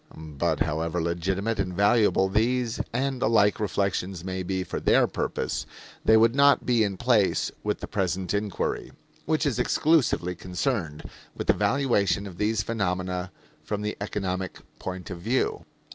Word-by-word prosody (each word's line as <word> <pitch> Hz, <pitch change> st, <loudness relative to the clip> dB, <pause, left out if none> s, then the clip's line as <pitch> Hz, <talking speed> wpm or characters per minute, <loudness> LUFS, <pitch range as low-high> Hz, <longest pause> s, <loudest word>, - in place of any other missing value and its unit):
But, 80 Hz, 0 st, -2 dB
however 80 Hz, +2 st, 0 dB
legitimate 95 Hz, +6 st, -1 dB
and 90 Hz, -1 st, -1 dB
valuable 100 Hz, -1 st, +3 dB
these 115 Hz, +4 st, +1 dB
and 130 Hz, +1 st, -1 dB
the -, -, +2 dB
like 105 Hz, -1 st, +3 dB
reflections 95 Hz, -3 st, -1 dB
may 95 Hz, 0 st, -3 dB
be 95 Hz, 0 st, -2 dB
for -, -, -4 dB
their -, -, +4 dB
purpose, -, -, -3 dB, 0.4 s
they 110 Hz, -, +6 dB
would 115 Hz, +1 st, +5 dB
not 140 Hz, +1 st, +4 dB
be 120 Hz, -3 st, +3 dB
in 100 Hz, -2 st, -2 dB
place 115 Hz, -4 st, +2 dB
in -, -, +1 dB
the -, -, -5 dB
present 95 Hz, -1 st, -2 dB
inquiry, 100 Hz, -1 st, -2 dB, 0.3 s
which 155 Hz, -1 st, +1 dB
is 130 Hz, -4 st, 0 dB
exclusively 125 Hz, -, +2 dB
concerned 90 Hz, -, -3 dB, 0.3 s
with -, -, -4 dB
the -, -, +5 dB
valuation 110 Hz, -8 st, +1 dB
of 90 Hz, -3 st, -9 dB
these 110 Hz, 0 st, +1 dB
phenomena 90 Hz, -4 st, -2 dB, 0.3 s
from 105 Hz, -1 st, -3 dB
the 105 Hz, -, -2 dB
economic 95 Hz, -2 st, -3 dB, 0.2 s
point 95 Hz, 0 st, -6 dB
of 90 Hz, -, -6 dB
view. 120 Hz, +9 st, -1 dB
100 Hz, 155 wpm, -26 LUFS, 90-115 Hz, 0.4 s, they